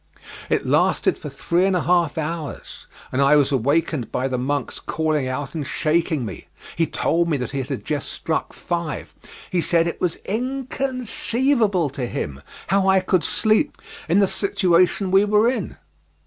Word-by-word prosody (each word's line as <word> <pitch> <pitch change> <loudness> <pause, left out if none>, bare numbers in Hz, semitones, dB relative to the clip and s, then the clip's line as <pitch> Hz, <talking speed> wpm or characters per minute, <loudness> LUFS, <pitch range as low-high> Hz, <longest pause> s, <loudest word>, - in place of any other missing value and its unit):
It - - +1
lasted - - +2
for - - -8
three 175 +1 0
and 195 -1 +2
a 180 - +1
half 170 -4 +2
hours, 160 -1 -5 0.2
and 130 - +1
I 140 +2 +5
was 145 -1 +3
awakened 140 0 0
by 130 - 0
the 130 -2 -2
monk's 140 +1 -2
calling 155 -4 -1
out 135 +2 -4
and 160 -3 -3
shaking 155 -1 0
me. - - -8 0.3
He 165 -1 +1
told 170 +1 +1
me 150 - +1
that 125 0 -5
it 135 -2 -3
had 135 - -4
just 150 -3 -2
struck 160 - -2
five. 170 -3 -4 0.4
He 180 -2 +2
said 165 +1 +2
it 170 - -4
was 175 -3 +1
inconceivable 250 - 0
to 135 -3 -3
him 70 - -4 0.3
how 195 +1 +3
I 190 0 +5
could 185 -1 +1
sleep 220 +7 +1 0.3
in 175 - +4
the 200 - +6
situation 185 -1 +2
we 195 +1 +6
were 210 +2 +3
in. 240 -6 -2
170 Hz, 170 wpm, -22 LUFS, 145-195 Hz, 0.4 s, the